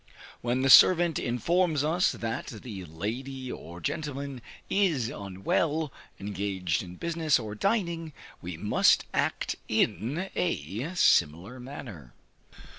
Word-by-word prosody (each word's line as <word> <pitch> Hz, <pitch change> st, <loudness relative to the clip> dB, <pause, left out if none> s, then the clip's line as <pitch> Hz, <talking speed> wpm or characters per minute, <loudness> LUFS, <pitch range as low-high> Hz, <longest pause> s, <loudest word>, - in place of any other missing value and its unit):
When 125 Hz, +2 st, 0 dB
the 135 Hz, -, +3 dB
servant 175 Hz, 0 st, +7 dB
informs 155 Hz, -, +1 dB
us 165 Hz, +4 st, +2 dB
that 115 Hz, 0 st, -4 dB
the 105 Hz, -4 st, -8 dB
lady 125 Hz, -, -5 dB
or 85 Hz, +2 st, -9 dB
gentleman 140 Hz, -, -4 dB, 0.3 s
is 165 Hz, -, +1 dB
unwell, 130 Hz, -, -1 dB, 0.3 s
engaged 95 Hz, -4 st, -2 dB
in 90 Hz, -1 st, -9 dB
business, 165 Hz, -, +1 dB
or 110 Hz, -3 st, -5 dB
dining, 170 Hz, -, -1 dB, 0.3 s
we 85 Hz, -1 st, -6 dB
must 105 Hz, +5 st, +3 dB
act -, -, -1 dB
in 120 Hz, -, 0 dB
a 125 Hz, -, -2 dB
similar 95 Hz, -, +2 dB
manner. 115 Hz, -, -9 dB
125 Hz, 115 wpm, -28 LUFS, 100-160 Hz, 0.3 s, servant